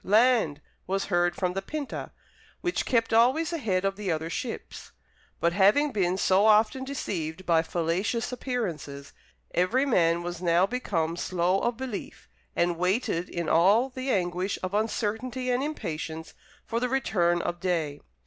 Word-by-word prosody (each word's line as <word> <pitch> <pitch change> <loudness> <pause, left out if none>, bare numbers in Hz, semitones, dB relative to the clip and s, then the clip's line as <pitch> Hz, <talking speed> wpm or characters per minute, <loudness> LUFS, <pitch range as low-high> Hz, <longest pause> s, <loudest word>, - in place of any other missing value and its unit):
Land!" 215 - +3 0.3
was 195 +1 -1
heard 175 0 +2
from 180 -2 -1
the 195 - -2
Pinta, 290 +6 -5 0.5
which 350 -1 -1
kept 230 -3 +1
always 265 +9 +3
ahead 195 - 0
of 195 0 -1
the 205 -4 -2
other 160 +1 -2
ships. 235 +4 -6 0.5
But, 170 0 +2
having 210 +10 +4
been 185 -5 +1
so 195 +2 +4
often 220 +4 +4
deceived 185 - -4
by 165 -2 +4
fallacious 180 +9 -1
appearances, 175 - -4 0.4
every 230 +10 +2
man 170 -9 +2
was 175 0 -5
now 175 +1 +4
become 175 -9 -2
slow 180 +2 +1
of 240 +1 -1
belief, 255 -6 -6 0.3
and 175 0 +1
waited 180 -2 0
in 170 -1 -3
all 200 +10 +4
the 260 +1 -5
anguish 180 -2 0
of 185 +1 -3
uncertainty 225 +4 -1
and 250 +1 +1
impatience 160 - -5 0.3
for 230 0 -1
the 250 +1 -1
return 180 -10 +1
of 175 0 -3
day. 165 -5 -1
195 Hz, 150 wpm, -27 LUFS, 175-245 Hz, 0.5 s, having